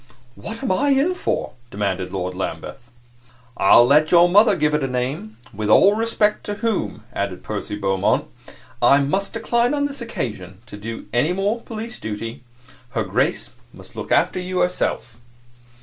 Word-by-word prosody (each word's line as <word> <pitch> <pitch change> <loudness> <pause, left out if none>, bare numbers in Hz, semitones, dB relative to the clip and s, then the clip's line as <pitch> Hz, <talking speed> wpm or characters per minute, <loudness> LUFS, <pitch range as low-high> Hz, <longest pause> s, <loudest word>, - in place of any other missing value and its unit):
"What 225 - -8
am 255 - 0
I 285 +10 +2
in 280 +6 +3
for?" 360 - -2 0.2
demanded 95 -3 -2
Lord 90 -1 -3
Lambeth. 120 +6 -6 0.7
"I 95 - +5
will 120 - +8
let 150 +4 +4
your 175 0 +6
mother 205 +3 +5
give 150 -4 +1
it 150 - +1
a - - 0
name. 125 -3 -4 0.2
With 105 +1 -3
all 195 - +6
respect 215 -1 0
to 205 - -3
whom," 195 - -2
added 100 -2 -3
Percy 105 -1 -4
Beaumont, 95 -2 +1 0.6
"I 140 - +6
must 170 +8 -1
decline 235 +3 +1
on 285 0 0
this 280 -2 -5
occasion 105 - -5
to - - -11
do 115 +3 -7
any 145 +9 +2
more 205 +5 -1
police 230 +1 -7
duty. 110 +2 -6 0.6
Her 110 - +2
Grace 75 -9 -1 0.2
must - - -15
look - - -7
after - - +2
you 180 0 -2
herself." 120 -9 -2
150 Hz, 165 wpm, -21 LUFS, -, 0.7 s, will